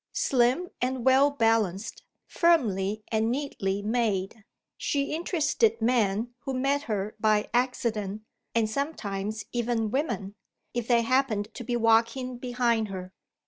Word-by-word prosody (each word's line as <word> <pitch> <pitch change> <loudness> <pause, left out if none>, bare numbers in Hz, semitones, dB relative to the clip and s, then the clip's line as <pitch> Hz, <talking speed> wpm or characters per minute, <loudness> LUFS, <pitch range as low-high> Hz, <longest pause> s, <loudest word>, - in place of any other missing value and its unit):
Slim 260 +7 +2
and 255 -1 -1
well 265 +2 +6
balanced, 225 -7 0 0.2
firmly 215 - +1
and 220 0 +1
neatly 205 -7 -2
made, 215 -2 -1 0.3
she 280 0 -1
interested 345 +6 +1
men 225 -1 +1
who 265 +1 -4
met 275 +2 +1
her 210 0 -2
by 215 -1 +2
accident 225 -5 -1 0.3
(and 225 -2 +3
sometimes 215 -5 -3
even 235 -2 -1
women), 250 -8 -2 0.4
if 240 -1 -2
they 235 -2 +4
happened 225 -4 +1
to - - -7
be 240 +1 -2
walking 230 +2 +2
behind 240 -3 0
her. 185 -1 -7
230 Hz, 125 wpm, -27 LUFS, 215-260 Hz, 0.4 s, well